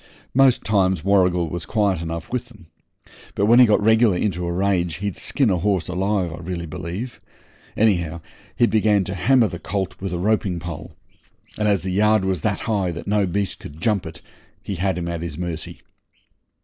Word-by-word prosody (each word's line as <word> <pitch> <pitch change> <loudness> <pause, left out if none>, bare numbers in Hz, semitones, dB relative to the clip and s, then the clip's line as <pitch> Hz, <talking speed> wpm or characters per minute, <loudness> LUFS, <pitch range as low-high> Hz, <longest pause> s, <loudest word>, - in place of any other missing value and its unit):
Most 130 -1 +4
times 95 -5 +2
Warrigal 90 -3 +3
was 85 +3 -5
quiet 100 -6 +1
enough 85 +5 -5
with 125 -1 -3
'em, 105 -7 -16 0.7
but 100 - +2
when 120 +3 +6
he 125 - +8
got 105 -1 +2
regular 110 -3 +4
into 90 -3 -1
a - - -1
rage 90 -2 0
he'd 100 +2 -3
skin 135 -7 +1
a 90 - +2
horse 90 -2 0
alive, 95 -1 -1
I - - -7
really 85 0 -5
believe. 90 +8 -6 0.6
Anyhow, 85 -7 +1 0.3
he 120 - +4
began 105 -3 +2
to 95 - -5
hammer 120 +4 +3
the 85 - -7
colt 95 0 -3
with 95 -1 -3
a 90 - -2
roping 95 -2 0
pole, 85 -2 -8 0.6
and 105 - 0
as 100 -3 +2
the 95 - -2
yard 105 +1 +3
was 95 -4 -1
that - - -1
high 100 -5 0
that 85 -1 -6
no 105 -1 +1
beast 100 +1 -2
could 75 +2 -11
jump 105 -3 0
it 80 - -10 0.4
he - - -4
had 95 +1 0
him 85 -1 -3
at 85 -1 -3
his 85 -3 -5
mercy. 85 -2 -5
95 Hz, 195 wpm, -22 LUFS, 85-105 Hz, 0.7 s, he